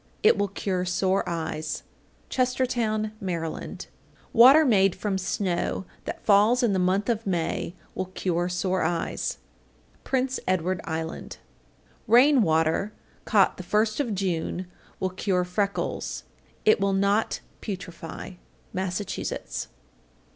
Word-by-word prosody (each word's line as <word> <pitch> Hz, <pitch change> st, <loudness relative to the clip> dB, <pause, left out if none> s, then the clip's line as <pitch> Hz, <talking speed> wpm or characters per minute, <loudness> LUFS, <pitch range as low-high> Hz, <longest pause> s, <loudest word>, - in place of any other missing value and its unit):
It 435 Hz, -, +7 dB
will 205 Hz, -, +1 dB
cure 185 Hz, -1 st, -2 dB
sore 190 Hz, +2 st, +1 dB
eyes. 160 Hz, -2 st, -3 dB, 0.4 s
Chestertown, 240 Hz, -4 st, 0 dB
Md. 190 Hz, -, -2 dB
839. 165 Hz, -1 st, -4 dB, 0.6 s
Water 270 Hz, +7 st, +8 dB
made 195 Hz, -7 st, +4 dB
from 200 Hz, -3 st, -2 dB
snow 185 Hz, 0 st, -1 dB, 0.2 s
that -, -, -6 dB
falls 215 Hz, +5 st, +5 dB
in 225 Hz, -4 st, +3 dB
the 190 Hz, -, +1 dB
month 185 Hz, +3 st, +1 dB
of 230 Hz, -3 st, -1 dB
May 170 Hz, -1 st, -1 dB, 0.2 s
will 185 Hz, -, -3 dB
cure 180 Hz, -1 st, -1 dB
sore 185 Hz, +1 st, 0 dB
eyes. 165 Hz, +1 st, -1 dB, 0.7 s
Prince 265 Hz, 0 st, 0 dB
Edward 185 Hz, 0 st, 0 dB
Island. 160 Hz, 0 st, -4 dB, 0.7 s
840. -, -, 0 dB
Rain 265 Hz, +2 st, +7 dB
water 160 Hz, +3 st, +2 dB, 0.3 s
caught 200 Hz, -4 st, +3 dB
the -, -, -5 dB
first 215 Hz, +5 st, +1 dB
of 240 Hz, -8 st, 0 dB
June 180 Hz, -1 st, -2 dB, 0.3 s
will 185 Hz, -, -1 dB
cure 185 Hz, -1 st, 0 dB
freckles. 200 Hz, +3 st, -2 dB, 0.4 s
It 215 Hz, -, +5 dB
will 195 Hz, 0 st, +1 dB
not 200 Hz, +3 st, +1 dB, 0.2 s
putrefy. 180 Hz, -3 st, -7 dB, 0.3 s
_Massachusetts. 190 Hz, +1 st, -3 dB
195 Hz, 125 wpm, -26 LUFS, 180-215 Hz, 0.7 s, Water